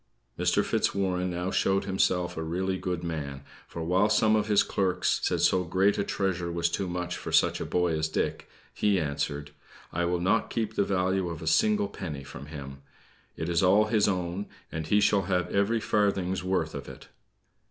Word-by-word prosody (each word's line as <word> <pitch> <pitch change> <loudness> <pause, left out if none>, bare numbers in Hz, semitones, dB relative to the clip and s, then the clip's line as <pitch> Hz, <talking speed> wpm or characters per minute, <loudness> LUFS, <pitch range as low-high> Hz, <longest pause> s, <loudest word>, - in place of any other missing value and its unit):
Mr. - - +1
Fitzwarren 90 -2 0
now 90 +1 -2
showed 95 0 +2
himself 90 -2 +1
a 80 - -3
really 90 +4 -1
good 90 -2 -3
man, 70 -5 -4 0.2
for 85 - -6
while 95 +5 +2
some 110 0 +4
of 105 -1 +1
his 105 -2 +4
clerks 95 -2 0
said - - 0
so 90 -1 +3
great 95 +4 +2
a - - +2
treasure 90 -4 -1
was 85 0 0
too 95 +1 -2
much 90 0 -3
for - - -6
such - - +3
a - - -3
boy 90 -2 +1
as 80 0 -1
Dick, - - -2 0.2
he 100 -2 +2
answered: 75 -1 -3 0.4
"I 85 0 0
will 90 0 0
not 95 +6 +1
keep 110 -2 -2
the 100 - +2
value 95 -1 0
of 85 -1 -6
a - - -6
single 210 - +3
penny 75 - -6
from 70 +1 -10
him! 70 -3 -8 0.6
It 80 - -3
is 85 -1 +1
all 100 +3 +5
his 105 -2 +3
own, 90 +1 -2 0.2
and 80 -1 -4
he 105 +5 +3
shall 100 -2 +3
have 90 -1 0
every 100 +4 +2
farthing's 95 -4 0
worth 95 0 -1
of - - -7
it." - - -12
90 Hz, 195 wpm, -28 LUFS, 85-100 Hz, 0.6 s, all